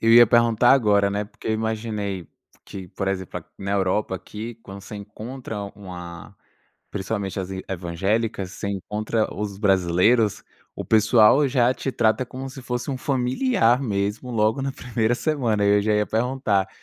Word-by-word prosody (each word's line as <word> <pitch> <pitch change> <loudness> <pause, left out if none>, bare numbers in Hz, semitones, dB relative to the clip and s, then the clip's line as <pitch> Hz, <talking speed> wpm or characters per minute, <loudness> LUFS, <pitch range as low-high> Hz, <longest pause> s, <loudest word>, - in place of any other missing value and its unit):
Eu 115 0 +4
ia 120 0 +9
perguntar 120 +1 +4
agora, 105 -6 +3
né, 100 +1 -1
porque 105 - -9
eu - - +2
imaginei 110 -5 -3 0.4
que, 95 -2 -8
por 95 +2 -3
exemplo, 95 -2 -4
na 100 +1 -3
Europa 95 0 0
aqui, 110 +5 -8
quando 100 0 -9
você 105 - -9
encontra 110 +2 -7
uma 90 -1 -9 0.5
principalmente 100 -1 -3
as 95 - -5
i 95 0 -5
evangélicas, 95 +3 -1
você - - -6
encontra 105 +3 -2
os 105 -2 -4
brasileiros, 95 +3 +3 0.3
o - - -5
pessoal 110 +5 +5
já 125 -1 +3
te 135 - -4
trata 115 +2 +2
como 130 +1 -7
se 135 - -9
fosse 125 +2 -3
um 135 - -2
familiar 125 - +2
mesmo 105 +1 -2
logo 110 +3 +2
na 135 0 -2
1º 120 -3 -1
semana, 120 -8 0
e 100 0 +5
eu - - 0
já 105 +1 +1
ia 105 0 +2
perguntar, 110 -4 0
110 Hz, 165 wpm, -23 LUFS, 100-120 Hz, 0.5 s, ia